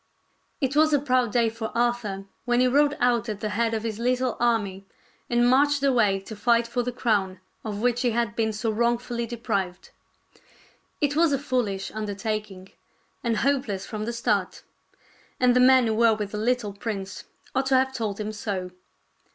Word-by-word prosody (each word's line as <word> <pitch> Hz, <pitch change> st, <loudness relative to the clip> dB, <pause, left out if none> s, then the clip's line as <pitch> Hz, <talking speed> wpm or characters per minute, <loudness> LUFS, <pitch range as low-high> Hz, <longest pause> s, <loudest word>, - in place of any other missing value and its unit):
II -, -, +4 dB
It 285 Hz, -, -6 dB
was 310 Hz, 0 st, +4 dB
a 290 Hz, -, +4 dB
proud 255 Hz, -4 st, +1 dB
day 235 Hz, 0 st, +3 dB
for 225 Hz, 0 st, -4 dB
Arthur 235 Hz, -5 st, -1 dB, 0.2 s
when 245 Hz, 0 st, +2 dB
he 255 Hz, -, +4 dB
rode 290 Hz, +3 st, +3 dB
out 240 Hz, -1 st, +2 dB
at 210 Hz, -2 st, -4 dB
the 215 Hz, -, -3 dB
head 225 Hz, +2 st, 0 dB
of 220 Hz, -, -3 dB
his 220 Hz, -2 st, -4 dB
little 250 Hz, +1 st, 0 dB
army 205 Hz, -5 st, 0 dB, 0.4 s
and 240 Hz, 0 st, +3 dB
marched 285 Hz, +2 st, +3 dB
away 235 Hz, -8 st, +3 dB
to 215 Hz, +3 st, -9 dB
fight 235 Hz, +2 st, +2 dB
for 235 Hz, +1 st, -2 dB
the 250 Hz, +1 st, -3 dB
crown 205 Hz, -6 st, 0 dB, 0.2 s
of 210 Hz, -2 st, -4 dB
which 245 Hz, 0 st, +2 dB
he 250 Hz, -, +2 dB
had 230 Hz, -2 st, -1 dB
been 220 Hz, -1 st, 0 dB
so 220 Hz, +1 st, -2 dB
wrong 235 Hz, +2 st, +2 dB
fully 235 Hz, -1 st, -4 dB
deprived. 200 Hz, -6 st, -3 dB, 1.1 s
It 290 Hz, -1 st, +1 dB
was 325 Hz, 0 st, +4 dB
a 275 Hz, -, +2 dB
foolish 245 Hz, -8 st, -2 dB
undertaking, 210 Hz, -2 st, -4 dB, 0.5 s
and 230 Hz, -2 st, 0 dB
hopeless 255 Hz, -9 st, 0 dB
from 215 Hz, 0 st, -5 dB
the 235 Hz, -, -3 dB
start; 235 Hz, -, -1 dB, 0.8 s
and 250 Hz, -1 st, +4 dB
the -, -, +5 dB
men 255 Hz, 0 st, +6 dB
who 220 Hz, -, +1 dB
were 225 Hz, 0 st, +4 dB
with 210 Hz, -2 st, -4 dB
the 210 Hz, -, -4 dB
little 230 Hz, -2 st, 0 dB
prince 200 Hz, -2 st, -5 dB, 0.3 s
ought 265 Hz, 0 st, 0 dB
to 265 Hz, -, +3 dB
have 265 Hz, 0 st, +2 dB
told 220 Hz, -5 st, -3 dB
him 215 Hz, 0 st, -3 dB
so. 195 Hz, -4 st, -4 dB
235 Hz, 190 wpm, -25 LUFS, 210-250 Hz, 1.1 s, men